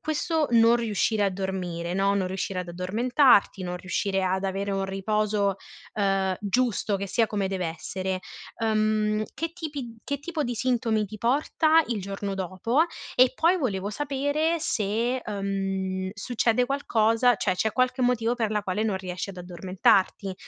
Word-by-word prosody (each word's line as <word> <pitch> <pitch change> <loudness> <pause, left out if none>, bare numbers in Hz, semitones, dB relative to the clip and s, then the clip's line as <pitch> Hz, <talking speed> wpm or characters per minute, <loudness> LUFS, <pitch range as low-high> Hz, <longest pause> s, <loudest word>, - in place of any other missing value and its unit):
questo 315 0 0
non 230 0 +6
riuscire 220 -2 0
a - - +3
dormire, 180 -3 -3
no, 195 +1 +2
non 195 -2 0
riuscire 185 0 -3
ad 175 - -7
addormentarti, 205 - +3
non 180 0 -3
riuscire 190 +1 -1
ad 190 +1 0
avere 195 +1 -2
un 195 0 -1
riposo, 200 0 0 0.4
ehm, 195 -2 +1
giusto 210 -1 0
che 200 +1 -4
sia 225 +4 +2
come 200 -2 -1
dev'essere, 185 +1 -3 0.4
ehm, 215 -1 +1
che 330 0 -3
tipi 290 -9 -6
che 285 0 -3
tipo 320 0 -3
di 245 -2 -2
sintomi 225 -3 +1
ti 215 +1 -9
porta 310 +6 +3
il 230 -4 -1
giorno 195 +1 -4
dopo, 195 - 0 0.3
e 255 0 +5
poi 340 +5 +3
volevo 205 - -2
sapere 290 +5 0
se, 230 0 0
ehm, 195 -3 -3
succede 235 +2 +1
qualcosa 240 -3 +2
cioè 185 -3 0
c'è 220 +2 0
qualche 255 0 +1
motivo 245 -1 +2
per 225 -3 -1
la 210 -1 0
quale 200 +3 -1
non 210 -3 0
riesci 185 0 -5
ad 190 - -8
addormentarti. 185 +2 +1
210 Hz, 155 wpm, -26 LUFS, 190-245 Hz, 0.4 s, non